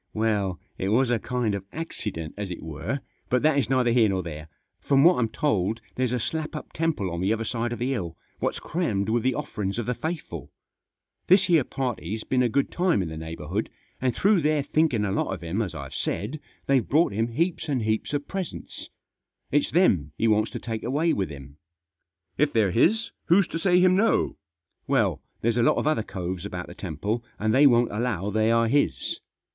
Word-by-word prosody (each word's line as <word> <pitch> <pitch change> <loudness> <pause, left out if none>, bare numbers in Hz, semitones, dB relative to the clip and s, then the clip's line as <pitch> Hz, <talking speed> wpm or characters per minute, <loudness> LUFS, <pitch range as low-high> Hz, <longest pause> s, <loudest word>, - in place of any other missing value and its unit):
" - - -48
Well, 105 -5 0 0.2
it 95 - -1
was 120 +3 +3
a 120 - +2
kind 120 -3 -1
of 100 -1 -3
accident, 105 - -5
as 100 -2 -4
it 90 - -6
were; 80 - -4 0.3
but 125 +2 +2
that 155 -2 +4
is 125 - -1
neither 130 -2 +3
here 115 -3 +4
nor 95 -1 -1
there. 75 -2 -7 0.3
From 140 -1 +3
what 175 -4 +6
I'm 115 -2 +1
told 110 -4 0
there's 130 -2 0
a 125 - 0
slap 155 +6 -3
up 150 - -7
temple 160 - -1
on 85 +1 -3
the 95 +3 +1
other 115 0 0
side 120 +1 -2
of 120 - -3
the 125 +2 -1
hill, 90 -11 -3 0.2
what's - - -1
crammed 110 - -1
with 115 +1 +2
the 130 +1 +1
offerings 100 -2 -3
of 120 - -2
the 125 - 0
faithful. 160 +5 -5 0.8
This 190 +2 +6
here 170 -6 +4
party's 110 -6 -3
been 130 -1 +1
a 125 - +3
good 140 +5 +1
time 175 - +2
in 85 - -4
the 80 - -6
neighbour 80 -1 -7
hood, 100 +8 -2 0.3
and 125 -2 +1
through 200 -2 +3
their 150 -1 +2
thinking 140 -9 +2
a 100 - -1
lot 95 - 0
of 95 - -4
him, 85 +6 -1
as 90 -6 -3
I've 70 -3 -7
said, 125 +10 -3 0.3
they've 135 -3 +2
brought 155 -5 +3
him 110 +3 +1
heaps 165 +7 -1
and 130 -5 0
heaps 110 0 -1
of 145 -1 -2
presents. 190 -4 -5 0.6
It's 145 0 +2
them 90 - +3
he 115 - +2
wants 110 0 +3
to - - -3
take 110 -2 -4
away 155 +6 +1
with 95 -2 -1
him." 70 -1 -10 0.4
" - - -54
If 150 0 +3
they're 105 -5 +3
his 225 - +2
who's 180 +2 +4
to 165 - -3
say 180 +1 +4
him 185 0 +5
no? 220 +4 +2 0.2
" 85 +1 -64
" - - -49
Well, - - +2 0.2
there's 115 +1 +1
a - - +4
lot 115 - +4
of - - 0
other 155 -6 +2
coves 90 -4 -5
about 90 0 -5
the - - -10
temple, 100 - -3
and 110 +1 +1
they 140 +2 +7
won't 120 -2 +4
allow 105 -3 -1
they 110 +2 +2
are 115 0 +3
his. 145 +5 +1
115 Hz, 220 wpm, -26 LUFS, 100-145 Hz, 0.8 s, they